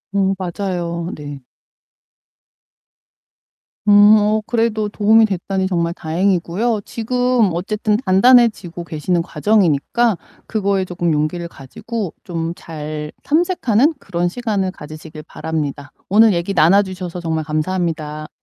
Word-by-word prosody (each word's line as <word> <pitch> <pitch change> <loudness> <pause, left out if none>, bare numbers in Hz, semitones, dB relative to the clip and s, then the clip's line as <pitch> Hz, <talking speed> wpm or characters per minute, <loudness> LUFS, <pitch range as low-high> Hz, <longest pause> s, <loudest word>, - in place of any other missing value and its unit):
음 195 -1 +2
맞아요. 175 -2 -3
네. 145 -2 -9 2.4
음 205 +1 +7
어 215 +1 +2
그래도 225 -2 0
도움이 220 +2 +4
됐다니 190 -1 -2
정말 170 -2 -1
다행이고요. 185 +6 0
지금 245 -1 +1
어쨌든 210 +4 -1
단단해지고 200 -5 +3
계시는 170 +2 -1
과정이니까 205 +3 +1 0.3
그거에 200 -3 0
조금 175 -1 -2
용기를 155 +3 -1
가지고 185 - -6
좀 165 -1 -3
잘 150 -1 -7
탐색하는 310 - +2
그런 175 0 -2
시간을 205 -3 -2
가지시길 155 -1 -10
바랍니다. 145 -3 -4 0.2
오늘 220 +3 +5
얘기 175 +3 -2
나눠 175 +4 +5
주셔서 180 -2 -6
정말 160 -2 -2
감사합니다. 155 -1 -3
185 Hz, 285 characters per minute, -18 LUFS, 165-215 Hz, 2.4 s, 음